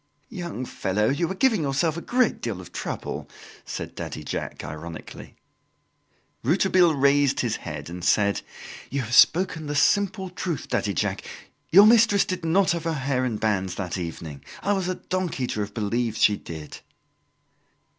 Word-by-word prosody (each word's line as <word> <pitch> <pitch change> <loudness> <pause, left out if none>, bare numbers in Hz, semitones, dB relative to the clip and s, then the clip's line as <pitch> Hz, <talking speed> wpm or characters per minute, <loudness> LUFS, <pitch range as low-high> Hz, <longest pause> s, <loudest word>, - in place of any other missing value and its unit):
"Young 170 - -5
fellow, 105 -1 0
you 160 +5 0
are 190 - -3
giving 225 -4 +3
yourself 145 +3 0
a 170 - -4
great 250 +2 +1
deal 110 -6 -3
of 90 - -11
trouble," - - -5 0.4
said - - -6
Daddy 75 - -6
Jacques - - -5
ironically. 80 +2 -8 1.1
Rouletabille 175 +3 +3
raised 140 0 +3
his 115 -3 -1
head 75 -3 -7
and 90 +1 -7
said: 100 +1 +2 0.5
"You 140 +1 -1
have 120 -1 -5
spoken 160 +2 +4
the 145 - -3
simple 190 +4 +2
truth, 175 -5 -4
Daddy 100 -4 0
Jacques; - - -1 0.5
your 200 +5 +8
mistress 220 -2 +5
did 185 -2 -4
not 180 +3 +3
have 170 -1 -2
her 165 - 0
hair 135 -3 -1
in 120 -4 -1
bands 95 -4 0
that 95 -1 -4
evening. 80 -4 -6 0.2
I 205 - +2
was 190 -3 -1
a 185 - -1
donkey 180 -9 -2
to 110 - -3
have 105 -1 -4
believed 115 +1 -1
she 105 - +4
did." 80 -5 -9
140 Hz, 165 wpm, -25 LUFS, -, 1.1 s, your